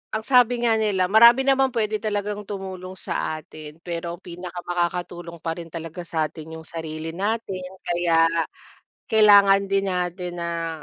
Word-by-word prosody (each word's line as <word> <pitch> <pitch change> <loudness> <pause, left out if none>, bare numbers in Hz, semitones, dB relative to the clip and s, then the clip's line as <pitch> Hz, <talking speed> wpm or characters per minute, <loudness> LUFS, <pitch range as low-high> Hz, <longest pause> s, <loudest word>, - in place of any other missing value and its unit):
ang 220 - -2
sabi 245 -1 +3
nga 225 -2 +3
nila, 190 -4 +1
marami 235 +4 +7
naman 270 -1 +3
pwede 215 -2 0
talagang 205 -1 -3
tumulong 190 -2 -7
sa 155 - -3
atin, 155 0 -12
pero 170 0 -4
pinakamakakatulong 175 -1 -4
pa 165 -1 -2
rin 170 - -8
talaga 165 +1 -7
sa'tin, 160 0 -3
yung 160 - -9
sarili 160 -1 -5
natin. 195 0 -3 0.2
Kaya, 170 -1 +2 0.9
kailangan 200 -2 +6
din 195 0 +1
natin 180 -1 -3
na 165 -1 -3
180 Hz, 140 wpm, -23 LUFS, 170-210 Hz, 0.9 s, marami